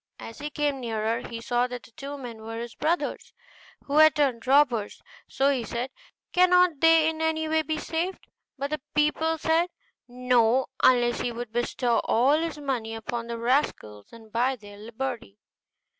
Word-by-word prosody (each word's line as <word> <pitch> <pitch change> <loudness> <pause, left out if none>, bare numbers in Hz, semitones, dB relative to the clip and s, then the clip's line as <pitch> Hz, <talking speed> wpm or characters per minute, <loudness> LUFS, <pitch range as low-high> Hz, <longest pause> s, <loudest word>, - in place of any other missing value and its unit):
As 225 - -10
he 295 - -4
came 290 -2 -1
nearer, 225 -2 -1
he 230 - -6
saw 245 +1 0
that 245 -2 -7
the 220 - -17
two 280 +5 -7
men 240 -5 -8
were 225 +1 -6
his 235 0 -6
brothers, 335 +3 -2 0.5
who 285 +1 -1
had 310 -2 +7
turned 255 -5 0
robbers; 260 -6 +3 0.3
so 275 +1 +2
he 260 -4 -1
said, 240 +4 -4 0.4
'Cannot 360 -3 +4
they 325 0 +5
in 320 0 -2
any 320 0 0
way 315 0 +2
be 315 0 -3
saved?' 335 +4 -3 0.3
But 280 +2 -4
the 305 - -2
people 315 +2 +2
said 325 +3 +1 0.4
'No,' 250 0 +2 0.2
unless 240 -1 +4
he 245 - -1
would 235 -1 -6
bestow 240 0 0
all 270 +7 +3
his 330 -1 -3
money 250 -6 -3
upon 230 +1 -5
the 235 0 -4
rascals 230 - -1
and 225 -2 -15
buy 250 +4 +1
their 205 -3 -13
liberty. 230 -1 -6
255 Hz, 175 wpm, -26 LUFS, 230-300 Hz, 0.5 s, had